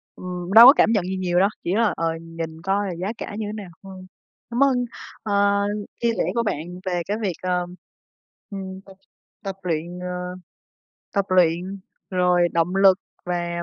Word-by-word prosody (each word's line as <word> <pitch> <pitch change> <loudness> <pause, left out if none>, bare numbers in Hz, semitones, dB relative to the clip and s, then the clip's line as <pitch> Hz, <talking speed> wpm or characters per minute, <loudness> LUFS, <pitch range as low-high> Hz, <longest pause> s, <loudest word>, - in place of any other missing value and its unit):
ừm, 180 0 -5
đâu 230 +3 +11
có 270 - +11
cảm 225 - +4
nhận 205 -5 +2
gì 190 +1 -3
nhiều 180 -1 +1
đâu, 195 +2 +4
chỉ 180 - 0
là, 220 -4 +2
ờ, 165 - -1 0.2
nhìn 165 -1 -7
coi 195 +3 0
là 185 - -3
giá 175 +3 -4
cả - - -6
như 220 - -2
thế - - -5
nào 205 -4 -7
thôi. 190 -1 -10 0.4
Cảm 240 +3 +2
ơn, 255 -3 +2 0.4
ờ, 200 -1 +2 0.4
chia 235 -1 +3
sẻ - - +2
của 235 - +2
bạn 180 -9 -1 0.2
về 180 -2 -1
cái 205 +2 -2
việc, 195 -4 0
ờ, 180 -1 0 0.8
ừm, 190 -2 -7
tập 195 - -14 0.5
tập 195 -1 -4
luyện, 170 +1 -3
ờ, 180 - -5 1.1
tập 200 -1 +2
luyện, 180 +1 +2 0.3
rồi 180 -1 +3
động 170 +3 +1
lực 195 -1 +6 0.3
và 175 -1 -2
185 Hz, 185 wpm, -23 LUFS, 175-200 Hz, 1.1 s, đâu